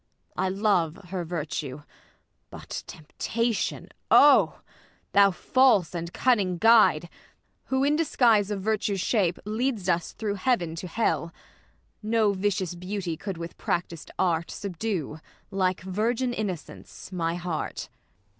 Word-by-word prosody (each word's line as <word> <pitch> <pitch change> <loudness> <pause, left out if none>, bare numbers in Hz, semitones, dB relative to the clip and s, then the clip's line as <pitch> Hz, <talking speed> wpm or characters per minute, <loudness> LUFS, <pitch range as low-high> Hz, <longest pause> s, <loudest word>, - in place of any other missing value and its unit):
I 190 - 0
love 190 -5 +1
her 185 -1 -3
virtue. 150 -4 -4 0.7
But, - - -7
temptation! 225 +8 -3 0.2
0! 290 0 +6 0.5
Thou 200 0 +6
false 205 -2 +3
and 170 -1 -4
cunning 200 -8 +1
guide! 215 -6 +5 0.6
who 265 0 0
in 295 +2 +3
disguise 230 -10 +3
Of 205 -2 -3
virtue's 210 -2 0
shape 185 -3 +1
lead'st 220 -2 -1
us 170 -2 0
through 210 -2 -3
heaven 180 -11 +1
to 180 - -5
hell. 170 -3 -1 0.7
No 215 -1 +2
vicious 190 -2 -1
beauty 180 -1 -4
could 190 +2 -6
with 170 0 -8
practised 170 -2 -3
art. 170 -2 +1
Subdue, 185 -5 -4 0.3
like 185 -3 0
virgin 225 +7 -1
innocence, 190 - -6
my 170 -2 -1
heart. 175 -2 -4
190 Hz, 120 wpm, -26 LUFS, 170-220 Hz, 0.7 s, 0